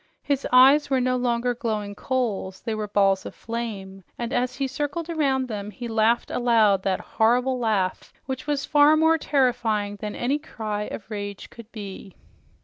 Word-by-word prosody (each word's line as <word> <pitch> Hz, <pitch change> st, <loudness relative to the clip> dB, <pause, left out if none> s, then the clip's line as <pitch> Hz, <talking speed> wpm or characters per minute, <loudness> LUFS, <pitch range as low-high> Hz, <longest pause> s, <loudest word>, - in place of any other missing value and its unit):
His 280 Hz, -1 st, -1 dB
eyes 275 Hz, +4 st, +6 dB
were 265 Hz, -1 st, +2 dB
no 255 Hz, 0 st, +1 dB
longer 245 Hz, 0 st, 0 dB
glowing 215 Hz, -4 st, -3 dB
coals, 205 Hz, -6 st, -2 dB
they 225 Hz, -, -3 dB
were 215 Hz, -1 st, -3 dB
balls 195 Hz, -1 st, +2 dB
of -, -, -8 dB
flame, 205 Hz, -5 st, -6 dB
and 240 Hz, +2 st, -4 dB
as 250 Hz, 0 st, 0 dB
he 275 Hz, +1 st, -1 dB
circled 295 Hz, +5 st, -3 dB
around 270 Hz, -5 st, +1 dB
them, 210 Hz, -3 st, -5 dB
he 240 Hz, +4 st, -7 dB
laughed 225 Hz, +1 st, +1 dB
aloud 220 Hz, -5 st, +3 dB
that 190 Hz, -1 st, 0 dB
horrible 250 Hz, +3 st, +1 dB
laugh 205 Hz, -6 st, -1 dB
which 265 Hz, +2 st, -5 dB
was 290 Hz, -1 st, -1 dB
far 295 Hz, +1 st, +5 dB
more 320 Hz, +1 st, +4 dB
terrifying 235 Hz, -8 st, 0 dB
than 210 Hz, +1 st, -5 dB
any 270 Hz, +5 st, 0 dB
cry 215 Hz, -8 st, -4 dB
of 215 Hz, -, -8 dB
rage 205 Hz, -1 st, -6 dB
could 230 Hz, -1 st, -13 dB
be. 200 Hz, -3 st, -9 dB
235 Hz, 170 wpm, -24 LUFS, 210-265 Hz, -, eyes